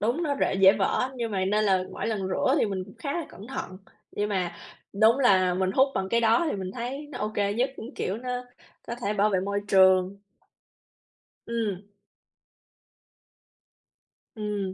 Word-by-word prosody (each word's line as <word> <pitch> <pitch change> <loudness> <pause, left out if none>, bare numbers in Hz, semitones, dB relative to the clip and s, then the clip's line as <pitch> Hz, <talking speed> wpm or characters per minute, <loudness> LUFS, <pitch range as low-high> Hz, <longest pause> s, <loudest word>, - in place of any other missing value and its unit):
đúng 240 +11 0
nó 290 -3 0
rễ - - +2
dễ 190 0 +7
vỡ 200 -2 0
á, 255 - -1
nhưng 235 -2 -3
mà 190 -2 0
nên 210 +2 +1
là 190 -2 +2
mỗi - - -4
lần 200 -4 -2
rửa 260 +8 +1
thì - - +2
mình 190 -2 -3
cũng 195 - -15
khá 280 +4 -3
là 340 -3 -3
cẩn 200 +4 -12
thận. 185 -8 -6 0.3
Nhưng 205 0 -1
mà 180 -4 -1 0.4
đúng 220 +5 +4
là 185 -8 +4
mình 185 +1 0
hút 265 +4 +4
bằng 190 0 -1
cái 235 +2 +2
đó 230 +8 +3
thì - - -2
mình 185 -1 -5
thấy 260 +5 -5
nó - - -7
ô 210 - -1
kê 205 0 0
nhất, 255 +4 +1
cũng, 240 +6 -9
kiểu, 190 - -2
nó 250 +1 -5 0.6
có 235 - -4
thể 205 - +1
bảo 210 +1 +2
vệ 190 - +1
môi 200 +1 -2
trường. 190 0 +4 1.3
Ừm. 220 -5 -2 2.5
Ừm. 205 -3 -3
205 Hz, 190 wpm, -26 LUFS, 190-235 Hz, 2.5 s, dễ